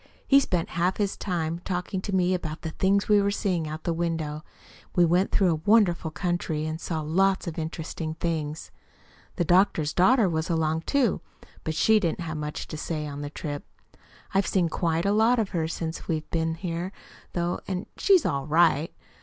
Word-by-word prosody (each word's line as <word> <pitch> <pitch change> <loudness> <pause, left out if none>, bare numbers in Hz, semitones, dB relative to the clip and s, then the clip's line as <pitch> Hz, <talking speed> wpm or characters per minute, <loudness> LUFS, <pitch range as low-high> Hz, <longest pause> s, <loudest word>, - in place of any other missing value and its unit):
He 275 - +7
spent 180 -11 -1
half 175 +3 0
his 205 -2 0
time 170 -3 -2
talking 180 +1 -3
to 200 - -5
me 185 -1 +2
about 160 -3 -4
the 160 - -3
things 195 +4 +1
we 210 -1 +5
were 200 - +2
seeing 185 -5 -1
out 155 +1 -6
the 170 - 0
window. 160 -3 -2 0.5
We 175 - +5
went 180 +3 +2
through 190 -3 +3
a 155 -1 -2
wonderful 190 -7 +4
country, 165 -2 -2
and 155 +1 -4
saw 160 -2 -2
lots 190 +5 +2
of 170 -2 -4
interesting 160 0 -4
things. 160 -2 -3 0.6
The 175 - 0
doctor's 175 -4 +3
daughter 220 +4 +4
was 160 -1 -1
along, 160 -1 0
too. 270 -7 +2 0.4
But 160 - -3
she 220 +7 +4
didn't 175 -3 -1
have 160 -1 -4
much 150 0 -4
to 155 - -5
say 155 0 -3
on 145 -1 -6
the 145 - -4
trip. 145 -1 -5 0.7
I've 195 +1 +2
seen 180 -4 +2
quite 165 +1 0
a 200 - +3
lot 225 +3 +4
of 215 -4 0
her 165 -4 -1
since 165 0 -5
we've 155 -2 -2
been 160 -1 0
here, 175 +1 -4 0.4
though, 175 0 -1
and 185 -1 -3
she's 380 -6 +4
ALL 140 -1 -1
RIGHT. 160 -1 +3
170 Hz, 190 wpm, -26 LUFS, 160-190 Hz, 0.7 s, He